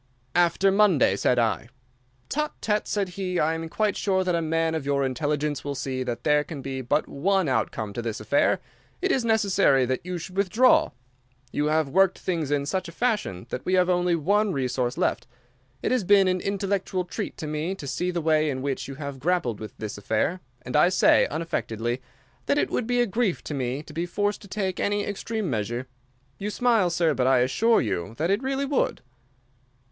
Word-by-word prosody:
"'After 175 +3 +3
Monday,' 190 - +4
said 125 +5 +1
I. 115 0 0 0.6
"'Tut, 300 +1 -2
tut,' 210 -1 0
said 200 -3 -1
he. 180 -1 -3
'I 160 +2 +2
am 165 0 -4
quite 215 +3 0
sure 190 -2 +1
that 180 -1 0
a 170 - +1
man 165 0 0
of 160 -3 -2
your 140 0 +1
intelligence 145 +2 -1
will 145 -1 -3
see 130 -1 -3
that 120 -1 -4
there 150 -1 +3
can 150 -4 -8
be 135 -1 -4
but 145 +5 0
one 190 +4 +1
outcome 110 -4 -1
to 120 - -3
this 115 -2 -4
affair. 110 +7 +2 0.4
It 380 +1 0
is 260 - +1
necessary 200 - +3
that 130 +1 -2
you 180 0 -4
should 175 +2 -8
withdraw. 210 +6 +4 0.6
You 150 - 0
have 155 -1 +2
worked 190 +6 +3
things 165 -6 -2
in 145 -1 0
such 185 +3 -2
a - - -9
fashion 210 - -1
that 125 - -4
we 185 - +1
have 180 0 +3
only 175 -1 +2
one 200 +6 +2
resource 125 -2 -1
left. - - 0 0.6
It - - 0
has 255 -4 +2
been 195 0 +5
an 185 -1 +1
intellectual 195 -2 -1
treat 175 - -5
to - - -5
me 155 +5 -2
to 150 - -9
see 140 +7 -2
the 175 -1 -2
way 155 -1 +2
in 130 -2 -3
which 140 -2 -2
you 135 - -7
have 140 -1 -6
grappled 145 - 0
with 110 - -9
this 105 -1 -6
affair, 110 - 0 0.2
and 125 0 -5
I 175 - +6
say, 185 - +4
unaffectedly, 120 -6 -2 0.5
that 285 - +2
it - - +1
would 235 - -1
be 245 0 +2
a - - +3
grief 220 -3 -1
to - - -5
me 130 +1 -2
to - - -12
be 170 +2 -2
forced 205 +3 -1
to 200 - -12
take 190 -2 -2
any 205 0 0
extreme 215 +1 -3
measure. 120 0 -2 0.5
You 205 +1 -3
smile, 225 -4 +2
sir, 170 -2 +2
but 130 -1 +1
I 130 -2 +4
assure 225 - +3
you 100 -1 -3
that 165 +5 0
it 200 +4 +1
really 270 +1 -1
would. 275 -1 0
165 Hz, 205 wpm, -25 LUFS, 135-195 Hz, 0.6 s, I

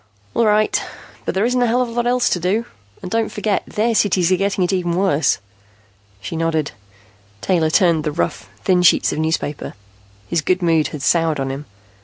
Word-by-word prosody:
"All 230 - +2
right, 215 0 +2 0.4
but - - -2
there 195 +3 +2
isn't 250 +1 +1
a 245 - +3
hell 245 +2 +2
of - - -4
a - - -8
lot 240 +1 -1
else 250 0 +2
to 180 - +1
do. 195 +7 0 0.4
And 180 - -6
don't 225 -1 0
forget, 210 -2 -1
their 230 +2 0
cities 190 -4 +2
are - - +5
getting 195 0 0
it 180 - 0
even 175 -2 0
worse." 180 -5 +2 0.8
She 165 - -6
nodded. 160 -2 -1 0.7
Taylor 170 -4 +1
turned 170 -2 +3
the 150 - -1
rough, 105 0 -3
thin 180 -1 +3
sheets 180 - +4
of - - -4
newspaper. 160 -2 -2 0.5
His 170 -2 0
good 185 +4 0
mood 165 -2 +3
had 145 -3 -7
soured 165 -3 +2
on 135 0 -2
him. 140 +2 -6
180 Hz, 200 wpm, -19 LUFS, 160-210 Hz, 0.8 s, are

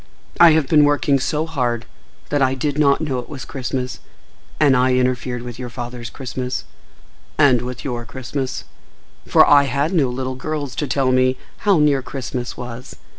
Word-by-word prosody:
—I 170 -2 +8
have 155 -3 +2
been 150 0 +5
working 145 -1 +2
so 150 +4 -1
hard 125 -7 -2 0.4
that 145 -1 0
I 130 0 +2
did 145 +2 -2
not 140 -1 +4
know 135 -5 -1
it 120 - -8
was 135 -6 -7
Christmas, 130 -1 -4 0.6
and 145 -4 +5
I 125 0 +3
interfered 125 -1 -1
with 120 -1 -8
your 125 -1 -5
father's 120 -1 -7
Christmas—and 130 +1 -2
with 125 0 -6
your 120 -3 -3
Christmas; 130 +2 -4 0.6
for - - +6
I 145 -1 +6
had 140 +6 -1
no 145 -8 +2
little 130 +1 -3
girls 145 +1 -4
to 150 - -1
tell 130 0 +1
me 130 0 +2 0.2
how 200 -3 +3
near 145 -3 +3
Christmas 125 -2 -5
was. 125 +1 -8
130 Hz, 170 wpm, -20 LUFS, 125-145 Hz, 0.6 s, I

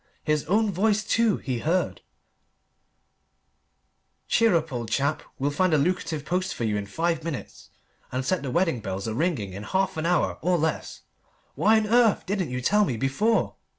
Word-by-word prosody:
His 150 -1 0
own 210 +5 +2
voice, 210 +3 +1
too, 225 0 +2
he 130 -4 -3
heard 170 +8 0 2.3
"Cheer 230 -5 +3
up, 160 -3 -1
old 120 -3 -4
chap! 140 +6 0 0.2
We'll 140 +1 0
find 175 +2 +2
a - - +4
lucrative 155 -1 -1
post 185 +4 -1
for - - -4
you 110 -2 0
in 100 -1 -3
five 165 +7 -1
minutes, 160 -5 -7 0.4
and 130 +1 -2
set 185 +1 0
the 140 - -4
wedding 165 -3 +1
bells 95 -2 -4
a 110 - -2
ringing 125 - -1
in 100 - -6
half 190 - -1
an 160 +1 -1
hour, 180 0 +1
or 180 +2 +2
less! 160 0 -2 0.5
Why 220 +1 +4
on 220 - +1
earth 230 -1 +3
didn't 190 -5 -1
you 125 0 -3
tell 210 +11 +3
me 130 - -1
before?" 170 - +1
165 Hz, 180 wpm, -25 LUFS, 130-190 Hz, 2.3 s, a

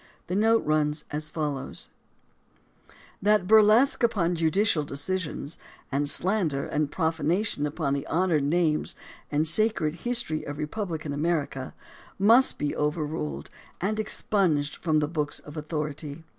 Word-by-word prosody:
The 180 - -3
note 225 +2 +3
runs 150 0 0
as 150 +1 -3
follows: 150 -5 -4 1.3
That 210 -2 +3
burlesque 220 +7 +5
upon 195 -7 +2
judicial 165 +1 +1
decisions, 150 +2 -3 0.3
and 140 +1 +1
slander 175 -6 +2
and 150 -1 -1
prof 160 -2 -1
anation 160 -1 0
upon 145 -2 -2
the 140 - -3
honored 170 -3 +1
names 155 0 +1 0.4
and 150 +2 +1
sacred 165 -3 +3
history 200 -4 -1
of 145 0 -6
re 150 - -2
publican 160 -5 -4
America, 145 -4 -2 0.4
must 230 +7 +5
be 145 - -2
overruled 150 - -3 0.3
and 215 +4 -1
expunged 180 -8 0
from 160 -3 0
the 150 -1 +1
books 150 -2 -2
of 150 - -11
authority. 150 0 -5
155 Hz, 130 wpm, -26 LUFS, 150-190 Hz, 1.3 s, burlesque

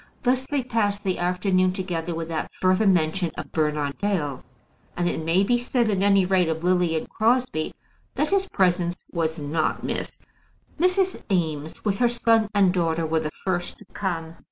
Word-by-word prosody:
Thus 260 0 +1
they 285 -3 -1
passed 205 -4 0
the 190 -3 -1
afternoon 185 +1 +1
together 175 -3 -3
without 165 -1 -3
further 185 +3 +3
mention 175 -1 +2
of - - -6
Bernard 150 -2 -1
Dale; 165 -10 -1 0.6
and 175 0 +1
it 160 - -2
may 170 +4 +3
be 240 +4 +2
said, 240 -2 +1
at 195 -2 0
any 195 -1 +4
rate 180 -2 +2
of 160 +1 -2
Lily 180 -2 +2
and - - -4
Crosbie, 230 -8 0 0.4
that 300 - 0
his 390 -1 +1
presence 175 -1 +1
was 165 -1 -1
not 155 +1 -1
missed. - - -4 0.6
Mrs. 365 +2 +2
Eames, 160 -3 -2
with 200 0 0
her 240 -1 +4
son 230 -2 +2
and 195 -3 +4
daughter, 165 -2 0
were 160 0 +1
the 155 -1 -3 0.2
first 175 -2 -2
to 210 - -16
come. 165 -4 -3
185 Hz, 175 wpm, -24 LUFS, 165-210 Hz, 0.6 s, any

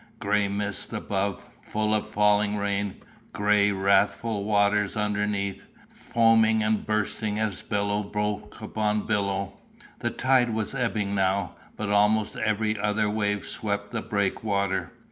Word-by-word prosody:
Gray 105 0 +1
mist 100 0 -2
above, 100 -1 -2
full 110 0 -3
of 105 0 -1
falling 105 0 +2
rain; 100 -1 -1 0.4
gray, 105 0 +3
wrathful 100 +2 +1
waters 105 0 +2
underneath, 105 -1 -1 0.3
foaming 110 -1 +3
and 110 0 0
bursting 105 0 -1
as 110 -3 -2
billow 100 0 -1
broke 105 0 -3
upon 105 -1 -1
billow. 100 -2 -1 0.5
The - - -1
tide 125 -3 +2
was 110 +2 -1
ebbing 110 -6 -1
now, 95 -1 +1 0.3
but 105 -1 -3
almost 105 +1 +3
every 110 0 0
other 105 +1 +1
wave 105 -1 -1
swept 105 -1 -2
the 115 -2 -2
breakwater. 100 -1 -1
105 Hz, 125 wpm, -26 LUFS, 100-110 Hz, 0.5 s, gray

